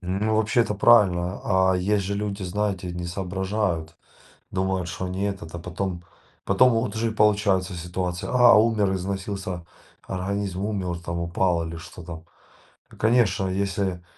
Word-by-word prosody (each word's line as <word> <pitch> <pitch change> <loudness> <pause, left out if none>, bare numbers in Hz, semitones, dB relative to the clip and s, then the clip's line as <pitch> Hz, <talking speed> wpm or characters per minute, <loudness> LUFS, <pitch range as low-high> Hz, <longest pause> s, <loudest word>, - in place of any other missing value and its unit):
Ну, 100 +4 0
вообще 110 +2 +2
это 110 -3 +1
правильно. 95 -4 +4 0.3
А - - +1
есть 100 +2 +1
же 100 - -2
люди, 100 -1 -3
знаете, 95 -1 -2
не 90 0 -5
соображают. 95 -2 -2 0.5
Думают, 95 -1 -1
что 90 +2 -4
они 95 +2 -3
этот, 95 -5 -4
а - - -4
потом 90 0 -4 0.4
потом 125 -1 +4
вот 115 -2 -1
уже 115 +1 0
и - - -2
получается 100 -3 +2
ситуация, 90 +1 -4
а, 125 -2 +7
умер, 105 -3 +3
износился, 95 -1 -4 0.4
организм 95 0 -3
умер 95 -5 -2
там, 85 0 -4
упал 85 0 0
или 80 0 -6
что 85 +2 -11
там. 80 -1 -9 0.7
Ну, - - -16
конечно, 110 -4 +3
если 95 -1 -1
95 Hz, 150 wpm, -24 LUFS, 90-105 Hz, 0.7 s, а